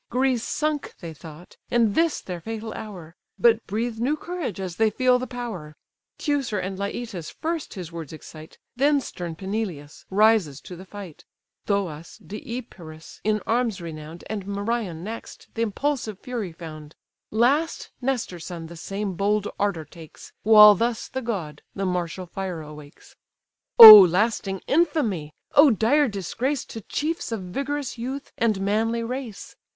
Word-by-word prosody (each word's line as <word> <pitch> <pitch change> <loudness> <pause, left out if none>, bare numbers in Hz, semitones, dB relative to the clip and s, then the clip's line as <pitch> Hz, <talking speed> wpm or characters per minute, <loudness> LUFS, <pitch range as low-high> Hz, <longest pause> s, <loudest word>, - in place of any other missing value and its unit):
Greece 255 -1 +1
sunk 305 -1 -2
they 165 -2 -7
thought, 160 +2 -13
and 230 -4 +2
this 330 +5 +1
their 180 -2 -7
fatal 225 +3 -6
hour; 180 -6 -9 0.2
But 230 -1 +3
breathe 225 +2 -2
new 275 +6 0
courage 340 - -5
as 185 -3 -5
they 220 0 +3
feel 250 +3 +2
the 255 - -4
power. 220 -12 -6 0.4
Teucer 280 -8 -1
and 190 +1 -3
Leitus 200 -4 -5
first 325 -4 -4
his 180 -4 -7
words 165 -4 -7
excite; 155 0 -12 0.2
Then 285 +3 +3
stern 175 -10 -6
Peneleus 190 -6 -5
rises 200 -8 +3
to 180 - -10
the 185 +2 -11
fight; 195 -6 -10 0.4
Thoas, 175 -6 -2
Deipyrus, 205 - -9
in 215 0 +1
arms 230 -3 0
renown'd, 160 0 -8
And 200 -3 -5
Merion 200 -4 -3
next, 225 +3 -8
the 225 - -3
impulsive 230 -1 -2
fury 235 -6 -5
found; 155 -2 -10 0.3
Last 275 +9 +1
Nestor's 245 -10 -3
son 170 -3 -6
the 170 +1 -10
same 195 +3 -4
bold 205 +3 0
ardour 195 -6 -1
takes, 160 +1 -14
While 210 -1 +9
thus 230 +3 -2
the 260 - -4
god 175 - -4
the 195 - -2
martial 180 0 -2
fire 180 -1 -5
awakes: 150 -1 -13 0.6
"Oh 215 -2 +15
lasting 195 +1 +2
infamy, 230 - 0 0.2
oh 290 +1 +8
dire 260 +6 +3
disgrace 235 - -2
To 225 - -8
chiefs 310 - -3
of 225 -3 -3
vigorous 275 +7 -4
youth, 265 +4 -5
and 220 -4 +1
manly 225 +4 0
race! 245 -3 -6
210 Hz, 150 wpm, -24 LUFS, 175-240 Hz, 0.6 s, Oh